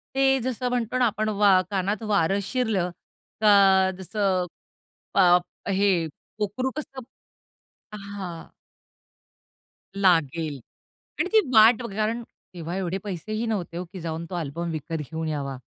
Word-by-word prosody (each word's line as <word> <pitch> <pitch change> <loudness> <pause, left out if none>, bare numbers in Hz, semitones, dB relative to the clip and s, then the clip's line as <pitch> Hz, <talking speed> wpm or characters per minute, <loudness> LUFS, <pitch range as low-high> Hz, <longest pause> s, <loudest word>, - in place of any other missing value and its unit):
ते 270 0 +4
जसं 250 0 -2
म्हणतो 245 0 -1
ना 250 - +4
आपण, 215 -1 0
वा 200 -3 +4
कानात 200 +2 -1
वारं 195 +1 +2
शिरलं 220 -6 0 0.5
का 195 -3 +6
जसं 190 -1 0 0.7
प - - +2 0.5
हे 195 -4 +2 0.3
पोकरू 210 +5 -1
कसं 270 -3 -6 1.0
हां. 195 -5 -7 1.5
लागेल. 165 -6 +2 0.6
आणि 360 - +1
ती 440 - +7
वाट 225 +2 +7
कारण 220 +3 -1 0.3
तेव्हा 170 +1 -5
एवढे 190 -1 -2
पैसे 200 +1 -5
ही 220 +2 -1
नव्हते 190 -6 -3
हो, 180 - -3
की 190 - -7
जाऊन 165 0 -4
तो 180 - -5
अल्बम 170 +1 -3
विकत 160 +1 -4
घेऊन 160 +2 -4
यावा. 140 -3 -3
195 Hz, 130 wpm, -25 LUFS, 170-215 Hz, 1.5 s, ती